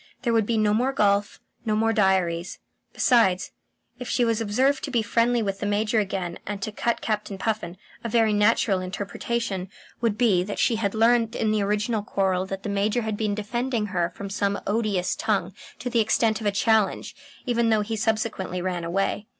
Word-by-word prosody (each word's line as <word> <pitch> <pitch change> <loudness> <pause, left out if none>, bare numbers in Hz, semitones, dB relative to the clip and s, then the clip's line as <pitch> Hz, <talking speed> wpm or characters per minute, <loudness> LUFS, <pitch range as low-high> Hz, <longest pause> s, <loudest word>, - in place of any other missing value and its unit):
There 235 - +1
would 220 -2 +2
be 230 - +1
no 210 -1 +3
more 250 +5 +2
golf, 205 -3 +1 0.2
no 215 -2 0
more 225 +1 +2
diaries. 185 -4 +1 0.3
Besides, 195 -7 +3 0.5
if 250 - -6
she 245 - +2
was 230 -1 0
observed 260 +6 +1
to - - -3
be 235 -4 +1
friendly 230 +2 +2
with 195 -1 -3
the 205 - -2
Major 210 +2 +1
again 190 -4 -3
and 205 0 -3
to 215 - -3
cut 235 +2 -1
Captain 210 -2 -2
Puffin, 190 -4 -3 0.3
a 230 - -3
very 225 -1 +3
natural 210 -1 +3
interpretation 195 +1 -3 0.3
would 225 -3 +1
be 220 -7 +3
that 205 +2 -5
she 230 - +2
had 205 -1 -1
learned 230 0 +3
that - - -4
in 215 - +2
the 215 -1 +1
original 210 +2 0
quarrel 190 -2 0
the 195 0 -4
Major 205 +4 0
had 220 -1 -2
been 210 -1 -1
defending 235 +2 -2
her 175 -1 +1
from 200 -1 -7
some 200 0 0
odious 205 -4 0
tongue 195 -4 -1 0.2
to 250 - -6
the 240 -1 +1
extent 220 0 +2
of 210 - -1
a - - +3
challenge, 220 0 +1 0.3
even 235 -2 +1
though 220 -1 +3
he 220 +2 -3
subsequently 215 -4 -1
ran 180 -1 -2
away. 195 +4 -1
210 Hz, 195 wpm, -25 LUFS, 195-230 Hz, 0.5 s, no